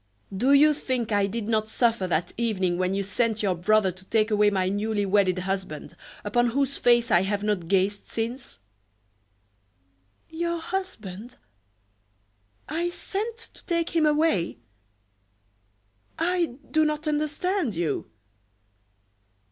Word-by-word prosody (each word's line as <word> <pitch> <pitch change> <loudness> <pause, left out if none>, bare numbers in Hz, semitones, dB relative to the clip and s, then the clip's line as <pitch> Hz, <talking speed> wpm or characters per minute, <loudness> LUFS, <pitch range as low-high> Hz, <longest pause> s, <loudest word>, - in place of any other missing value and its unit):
Do 250 +8 +2
you 300 +2 +7
think 255 -6 -2
I 205 -1 +2
did 215 +1 -4
not 220 -1 0
suffer 230 -4 +1
that 170 -1 -1
evening 190 -6 0
when 185 +1 0
you 200 - 0
sent 220 +2 0
your 195 -2 +2
brother 195 +3 +2
to 185 +1 -13
take 220 +2 +1
away 210 0 +4
my 190 -2 0
newly 205 +1 0
wedded 190 -2 +2
husband, 185 -4 -4 0.3
upon 240 +4 +2
whose 275 +3 0
face 240 -1 +3
I 175 - +5
have 200 +1 -1
not 205 -5 -1
gazed 195 +2 +1
since?" 235 +3 -4 1.7
"Your 340 +1 -2
husband! 250 - -5 1.3
I 335 +3 -1
sent 425 +6 -4 0.2
to - - -16
take 335 -1 0
him 325 -3 +3
away! 300 - +1 1.6
I 340 -5 0 0.2
do 315 0 +4
not 305 0 -1
understand 305 - -1
you." 160 -8 -2
220 Hz, 130 wpm, -26 LUFS, 195-300 Hz, 1.7 s, you